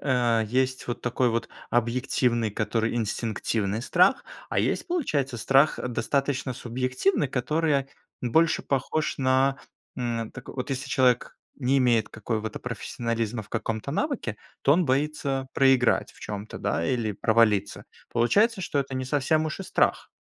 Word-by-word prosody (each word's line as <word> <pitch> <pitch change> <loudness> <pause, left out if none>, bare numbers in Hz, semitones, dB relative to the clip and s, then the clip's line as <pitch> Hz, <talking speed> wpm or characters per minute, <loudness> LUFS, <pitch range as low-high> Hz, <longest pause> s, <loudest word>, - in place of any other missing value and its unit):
э, 120 -4 +2
есть 130 +3 0
вот 120 - -4
такой 125 0 +1
вот 115 +1 -2 0.2
объективный, 120 -1 +1
который 110 +2 -1
инстинктивный 110 -1 -1
страх. 180 - +3 0.2
А - - -1
есть, - - -1
получается, 145 - -1
страх, 135 +6 +3
э, - - -3
достаточно 135 +1 -1
субъективный, 130 +8 0
который 140 +2 0 0.3
больше 160 +7 +2
похож 140 +3 -1
на, 135 +1 +3 0.4
м. 115 -2 -2
Так 135 - -11
вот, 130 +1 -5
если 135 +1 -3
человек 125 -3 +2 0.2
не 135 0 +2
имеет 120 -4 +3
какого-то 110 0 -4
профессионализма 115 -1 -3
в 105 - -18
каком-то 115 +2 -3
навыке, 220 - -2 0.3
то 140 - +5
он 180 +2 +2
боится 135 -1 -1
проиграть 135 -3 +3
в - - -20
чём-то, 105 0 -6
да 85 - -1
или 115 -4 0
провалиться, 105 -2 +2 0.3
получается 200 - +3
что 160 -5 -2
это 135 -1 -2
не 130 0 -2
совсем 145 +4 +1
уж 155 - -5
и - - -3
страх. - - +1
130 Hz, 145 wpm, -26 LUFS, 115-140 Hz, 0.4 s, то